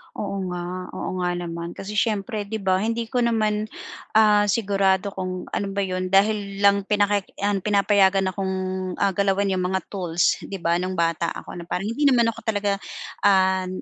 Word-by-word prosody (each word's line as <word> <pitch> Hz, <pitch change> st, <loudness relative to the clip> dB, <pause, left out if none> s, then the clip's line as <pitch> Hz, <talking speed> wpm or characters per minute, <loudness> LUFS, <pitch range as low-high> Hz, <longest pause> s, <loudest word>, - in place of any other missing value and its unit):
Oo, 200 Hz, -1 st, -3 dB
nga, 180 Hz, +1 st, -5 dB
oo, -, -, -4 dB
nga 180 Hz, 0 st, 0 dB
naman. 170 Hz, -1 st, -5 dB
Kasi 195 Hz, -, -7 dB
siyempre 210 Hz, -1 st, -1 dB
'di 220 Hz, -, -4 dB
ba, 185 Hz, -1 st, +2 dB
hindi 230 Hz, +3 st, -1 dB
ko 250 Hz, -, +1 dB
naman, 215 Hz, -3 st, +1 dB, 0.5 s
ah, 210 Hz, -1 st, +5 dB
sigurado 195 Hz, -2 st, +1 dB
kung 185 Hz, -1 st, -4 dB
ano 200 Hz, -, -1 dB
ba 200 Hz, -, +1 dB
'yon. 185 Hz, -1 st, -2 dB
Dahil 200 Hz, +1 st, +1 dB
lang 200 Hz, 0 st, +4 dB
pinaki 205 Hz, -1 st, +1 dB
yan, 200 Hz, 0 st, 0 dB
pinapayagan 195 Hz, -1 st, +3 dB
akong, 190 Hz, 0 st, -2 dB, 0.4 s
ah, 200 Hz, -, +1 dB
galawin 200 Hz, +1 st, +1 dB
'yong 185 Hz, -1 st, 0 dB
mga 190 Hz, 0 st, -1 dB
tools, 175 Hz, -4 st, +1 dB
'di 200 Hz, -, -7 dB
ba, 170 Hz, +1 st, +2 dB
nung 185 Hz, +1 st, -3 dB
bata 165 Hz, 0 st, +1 dB
ako. -, -, -8 dB
Na 170 Hz, -, -9 dB
parang 195 Hz, +6 st, -2 dB
hindi 285 Hz, +5 st, +2 dB
naman 235 Hz, -4 st, +4 dB
ako -, -, -11 dB
talaga, 205 Hz, -2 st, 0 dB, 0.5 s
ah, 190 Hz, -1 st, +3 dB
195 Hz, 180 wpm, -23 LUFS, 185-205 Hz, 0.5 s, ah